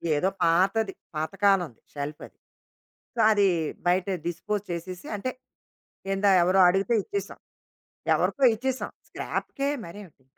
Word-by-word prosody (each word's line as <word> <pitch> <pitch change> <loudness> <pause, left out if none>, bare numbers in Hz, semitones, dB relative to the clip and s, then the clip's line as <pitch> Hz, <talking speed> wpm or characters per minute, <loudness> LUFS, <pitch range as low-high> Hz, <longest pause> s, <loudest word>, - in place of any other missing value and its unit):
ఏదో 185 +6 +2
పాతది, 195 +5 +2 0.2
పాతకాలంది 180 - +1
షెల్ఫది. 145 +1 -7 0.8
సో, - - -5
అది 205 -2 +4 0.4
బయట 180 +1 +2 0.2
డిస్పోజ్ 200 +4 -2
చేసేసి, 175 +2 -6
అంటే 255 +6 -3 0.8
ఏందో 195 +1 +3
ఎవరో 185 +2 +4
అడిగితే 195 +6 +2
ఇచ్చేసాం. 400 - -5 0.8
ఎవరికో 280 - +1
ఇచ్చేసాం. 260 +3 -3 0.2
స్క్రాప్‌కే, 275 0 -3 0.2
మరేమిటింక, 170 -8 -13
195 Hz, 105 wpm, -26 LUFS, 170-210 Hz, 0.8 s, అది